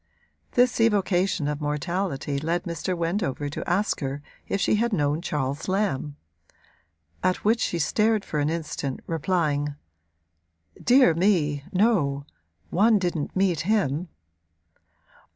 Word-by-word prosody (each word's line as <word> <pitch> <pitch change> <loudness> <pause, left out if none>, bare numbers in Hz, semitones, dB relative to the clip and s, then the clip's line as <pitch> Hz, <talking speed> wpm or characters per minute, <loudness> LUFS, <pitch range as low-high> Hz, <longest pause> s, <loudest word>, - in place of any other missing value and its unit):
This 245 -1 +3
evocation 195 -7 +2
of 150 0 -3
mortality 150 -1 -2
led 170 +4 -1
Mr. 170 +2 -3
Wendover 165 -5 -1
to 145 - -5
ask 195 +4 +1
her 140 0 -4 0.2
if 200 - -1
she 210 - +2
had 235 +2 +1
known 150 -2 +1
Charles 145 -4 -2
Lamb; 185 -8 -1 1.1
at 185 +2 0
which 225 +2 +3
she 175 - 0
stared 210 +6 +1
for 150 - -2
an 145 +1 +1
instant, 155 -4 -3
replying: 150 -4 0 1.1
'Dear 250 -7 +6
me, 160 -6 +1
no 180 -9 +2 0.5
one 215 +5 +4
didn't 175 -6 -2
meet 185 -4 +2
him.' 180 -4 0
170 Hz, 120 wpm, -25 LUFS, 145-200 Hz, 1.1 s, Dear